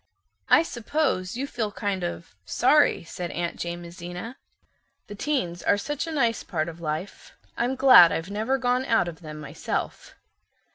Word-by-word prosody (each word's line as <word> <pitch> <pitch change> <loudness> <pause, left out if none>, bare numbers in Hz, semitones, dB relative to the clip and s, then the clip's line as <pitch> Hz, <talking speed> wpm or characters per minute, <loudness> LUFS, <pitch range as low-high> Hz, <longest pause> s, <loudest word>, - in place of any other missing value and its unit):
"I - - +6
suppose 240 - -1
you 270 - -2
feel 225 -6 -3
kind 200 -2 -3
of, 170 -1 -5
sorry" 290 -1 +3
said 175 +1 -6
Aunt 170 0 -3
Jamesina. 175 +5 -7 0.7
"The 205 - -9
teens 200 - -2
are 205 - +2
such 295 +9 -3
a - - -4
nice 235 -7 +1
part 155 -3 -2
of 170 0 -11
life. 160 +4 -5 0.2
I'm 245 +3 0
glad 255 -11 +8
I've 165 +4 -3
never 220 +6 0
gone 250 0 +1
out 225 -8 +2
of 165 -2 -7
them 155 -2 -8
myself." 150 +1 -5
200 Hz, 155 wpm, -25 LUFS, 170-255 Hz, 0.7 s, glad